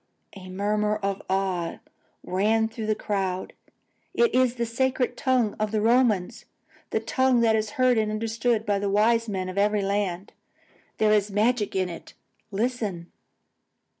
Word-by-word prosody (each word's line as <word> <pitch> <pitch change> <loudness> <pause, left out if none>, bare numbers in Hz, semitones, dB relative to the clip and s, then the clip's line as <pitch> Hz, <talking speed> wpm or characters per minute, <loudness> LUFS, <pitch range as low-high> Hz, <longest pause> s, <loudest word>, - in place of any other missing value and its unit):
"_ 185 - -11
A - - -10
murmur 210 +2 0
of 195 0 -1
awe 190 -3 -1 0.5
ran 215 +4 +1
through 220 -1 -6
the 215 - +1
crowd. 190 -3 -3 0.6
"It 470 -2 +3
is 255 -1 +3
the 235 -1 -1
sacred 250 +1 0
tongue 250 -6 +1
of 215 0 0
the 215 - +1
Romans: 225 -4 +2 0.4
the - - 0
tongue 260 -2 +2
that 225 -1 +4
is 215 -1 -1
heard 255 -2 +4
and 215 -1 0
understood 225 +1 -1
by 205 -1 +1
the 200 0 -1
wise 225 +3 +2
men 190 -2 -3
of 185 +2 -3
every 205 0 +2
land. 195 -1 -2 0.6
There 215 -1 +3
is 210 -1 +2
magic 210 +1 +1
in 185 -1 +1
it. 170 -2 -10 0.3
Listen!" 210 -5 -3
215 Hz, 160 wpm, -25 LUFS, 195-230 Hz, 0.6 s, that